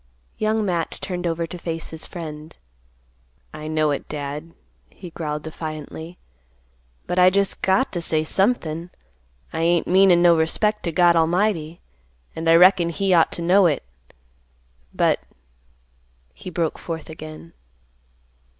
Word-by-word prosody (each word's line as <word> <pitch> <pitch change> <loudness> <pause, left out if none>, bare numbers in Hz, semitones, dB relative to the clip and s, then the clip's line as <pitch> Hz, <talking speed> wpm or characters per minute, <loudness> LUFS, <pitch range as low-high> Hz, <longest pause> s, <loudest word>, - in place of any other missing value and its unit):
Young 215 0 0
Matt 175 -4 -2
turned 180 -1 -4
over 165 0 -1
to 175 +2 -8
face 165 -1 -5
his 160 0 -5
friend; 155 -2 -8 1.0
"I 155 0 -7
know 155 -1 +1
it, 140 - -4
Dad;" 150 +2 -6 0.3
he 180 -3 -12
growled 150 -2 -4
defiantly; 160 +1 -7 0.9
"but 180 - -1
I 180 0 +7
just 200 +1 0
got 190 +8 +2
to 175 - -2
say 155 -1 +3
somethin'; 175 -3 0 0.6
I - - -3
ain't 170 0 +2
meanin' 185 -1 +5
no 175 -1 +7
disrespect 210 +7 +1
to 170 - -1
God 175 +1 +4
'lmighty, 170 -1 0 0.5
and 165 0 -1
I 165 - +7
reckon 180 0 +6
He 190 +3 0
ought 165 -2 +4
to 170 - -4
know 185 +2 +5
it; 150 -4 -1 1.1
but—" - - +1 1.1
he 185 - -9
broke 165 -2 -2
forth 165 -2 -6
again. 155 +1 -10
170 Hz, 140 wpm, -22 LUFS, 160-180 Hz, 1.1 s, I